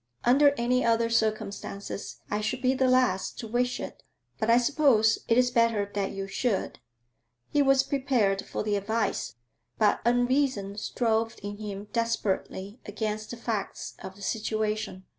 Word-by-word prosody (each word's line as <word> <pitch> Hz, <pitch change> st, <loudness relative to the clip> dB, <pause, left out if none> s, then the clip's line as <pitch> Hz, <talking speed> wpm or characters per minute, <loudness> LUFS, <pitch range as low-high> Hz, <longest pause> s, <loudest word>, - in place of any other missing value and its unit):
'Under 280 Hz, +4 st, +5 dB
any 250 Hz, +2 st, +2 dB
other 230 Hz, 0 st, +2 dB
circumstances 215 Hz, -3 st, -2 dB
I 210 Hz, +1 st, 0 dB
should 250 Hz, +5 st, -2 dB
be 255 Hz, +1 st, +4 dB
the 260 Hz, 0 st, +2 dB
last 250 Hz, -7 st, +2 dB
to 230 Hz, -, -6 dB
wish 245 Hz, +2 st, 0 dB
it, -, -, -7 dB, 0.4 s
but 220 Hz, -, 0 dB
I 230 Hz, -, +7 dB
suppose 245 Hz, -4 st, +3 dB
it 230 Hz, -, +3 dB
is 250 Hz, 0 st, +4 dB
better 230 Hz, -4 st, +2 dB
that 200 Hz, -1 st, -1 dB
you 195 Hz, 0 st, -4 dB
should.' 195 Hz, +1 st, -2 dB, 0.7 s
He 290 Hz, -, +3 dB
was 270 Hz, -1 st, +4 dB
prepared 250 Hz, -9 st, +1 dB
for -, -, -3 dB
the 210 Hz, -1 st, 0 dB
advice, 205 Hz, -, -1 dB, 0.4 s
but 215 Hz, -2 st, +3 dB
unreason 245 Hz, -4 st, +1 dB
strove 225 Hz, +1 st, 0 dB
in 205 Hz, 0 st, -5 dB
him 205 Hz, -1 st, -6 dB
desperately 220 Hz, -2 st, -2 dB
against 215 Hz, -1 st, -3 dB
the 240 Hz, -, -6 dB
facts 225 Hz, -4 st, -4 dB
of 190 Hz, -, -8 dB
the 200 Hz, -, -12 dB
situation. 215 Hz, -3 st, -2 dB
225 Hz, 155 wpm, -28 LUFS, 205-245 Hz, 0.7 s, I